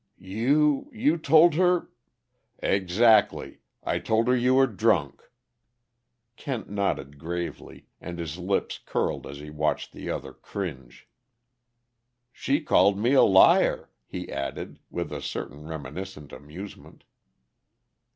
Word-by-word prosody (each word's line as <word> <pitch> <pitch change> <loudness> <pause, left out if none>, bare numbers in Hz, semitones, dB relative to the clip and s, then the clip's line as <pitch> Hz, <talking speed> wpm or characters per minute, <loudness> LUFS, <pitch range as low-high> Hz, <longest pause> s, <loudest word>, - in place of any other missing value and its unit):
"You 135 - +1
you 250 +5 +1
told 160 +2 +6
her 180 +1 +2 0.3
" 125 -1 -29
"Ex 95 0 -1
actly. 115 -2 +4 0.2
I - - -1
told 110 +1 +1
her 125 - +4
you 125 +1 +2
were 135 0 +6
drunk." 100 - 0 1.1
Kent 120 -8 -5
nodded 70 -9 -2
gravely, 85 +2 -6 0.2
and 85 -1 -7
his 85 0 -5
lips 95 +2 -1
curled - - -2
as 70 - -8
he 75 +1 -10
watched 75 0 -2
the - - -7
other 65 - -5
cringe. 70 -11 -7 1.3
"She 140 +4 0
called 100 -8 +3
me 120 +6 +1
a 135 - +7
liar," 95 -1 +5 0.2
he - - -6
added, 70 - -5
with - - -4
a - - -5
certain 75 +3 -6
reminiscent 75 0 -7
amusement. 75 +9 -11
100 Hz, 125 wpm, -26 LUFS, 75-125 Hz, 1.3 s, a